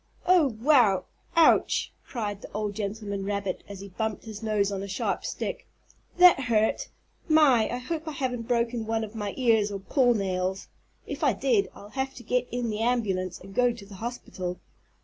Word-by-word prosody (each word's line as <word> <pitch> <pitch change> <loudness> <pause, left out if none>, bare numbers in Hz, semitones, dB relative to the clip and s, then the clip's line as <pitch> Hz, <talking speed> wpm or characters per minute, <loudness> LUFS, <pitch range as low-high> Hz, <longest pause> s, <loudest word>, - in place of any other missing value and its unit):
"Oh, 340 -10 +4
wow! 230 -9 +4 0.3
Ouch!" 330 -1 +4
cried 210 -5 -4
the - - -10
old 210 0 -2
gentleman 200 -1 -4
rabbit 200 -1 -3
as 200 -1 -8
he 200 - -9
bumped 220 +2 -3
his 215 -1 -8
nose 210 -2 +1
on 195 -1 -3
a 200 - -5
sharp 190 - -2
stick. - - -4 0.5
"That 360 -4 +8
hurt! 225 - +1 0.4
My, 285 -8 +5
I 245 - -2
hope 320 +6 -4
I 310 - -3
haven't 250 -4 -3
broken 235 -2 0
one 225 0 0
of 215 0 -7
my 205 -3 -4
ears 225 -5 +3
or 200 - -3
paw 245 +5 +3
nails. 190 -2 -2 0.4
If - - -5
I - - +4
did 425 -5 +1
I'll 205 - -12
have 265 +3 -3
to 240 - -10
get 250 +2 0
in 245 -2 -2
the 210 - -3
ambulance 195 -7 0
and 195 +1 -12
go 245 +3 +3
to 230 -4 -11
the 200 - -13
hospital." 185 -6 -5
220 Hz, 190 wpm, -27 LUFS, 200-250 Hz, 0.5 s, That